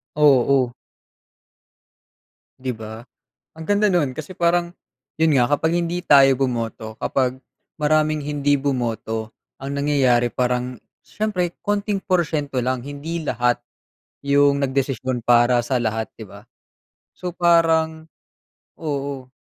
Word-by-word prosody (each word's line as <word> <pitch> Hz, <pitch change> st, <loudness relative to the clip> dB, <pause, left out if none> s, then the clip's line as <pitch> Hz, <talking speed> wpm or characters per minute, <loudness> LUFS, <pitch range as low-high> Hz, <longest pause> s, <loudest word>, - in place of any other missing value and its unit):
Oo. 135 Hz, -3 st, +4 dB, 1.9 s
'Di 130 Hz, 0 st, -3 dB
ba? 110 Hz, +1 st, -9 dB, 0.5 s
Ang 160 Hz, -, -8 dB
ganda 205 Hz, +1 st, +3 dB
no'n, 175 Hz, -8 st, +1 dB
kasi 155 Hz, +6 st, -8 dB
parang 170 Hz, 0 st, +1 dB, 0.5 s
'yun 160 Hz, -1 st, +3 dB
nga 120 Hz, -, +4 dB
kapag 160 Hz, +3 st, +1 dB
hindi 175 Hz, +1 st, -2 dB
tayo 135 Hz, -3 st, +6 dB
bumoto 115 Hz, -4 st, -3 dB
kapag 130 Hz, -1 st, 0 dB, 0.4 s
maraming 155 Hz, 0 st, +2 dB
hindi 145 Hz, -1 st, +1 dB
bumoto 115 Hz, -5 st, -2 dB, 0.3 s
ang 140 Hz, +1 st, -4 dB
nangyayari 130 Hz, -5 st, +3 dB
parang 125 Hz, 0 st, -1 dB, 0.3 s
siyempre 180 Hz, -5 st, -2 dB
konting 205 Hz, -1 st, -1 dB
porsyento 155 Hz, -6 st, 0 dB
lang, 125 Hz, 0 st, -1 dB
hindi 145 Hz, +4 st, -5 dB
lahat 120 Hz, -2 st, +1 dB, 0.7 s
yung 140 Hz, 0 st, +3 dB
nagdesisyon 130 Hz, -2 st, -1 dB
para 120 Hz, 0 st, +4 dB
sa 125 Hz, 0 st, 0 dB
lahat 110 Hz, -1 st, -2 dB
'di -, -, -7 dB
ba? -, -, -13 dB, 0.7 s
So 180 Hz, -, -5 dB
parang 160 Hz, -2 st, +2 dB, 0.7 s
oo. 140 Hz, -4 st, -4 dB
140 Hz, 115 wpm, -21 LUFS, 125-160 Hz, 1.9 s, tayo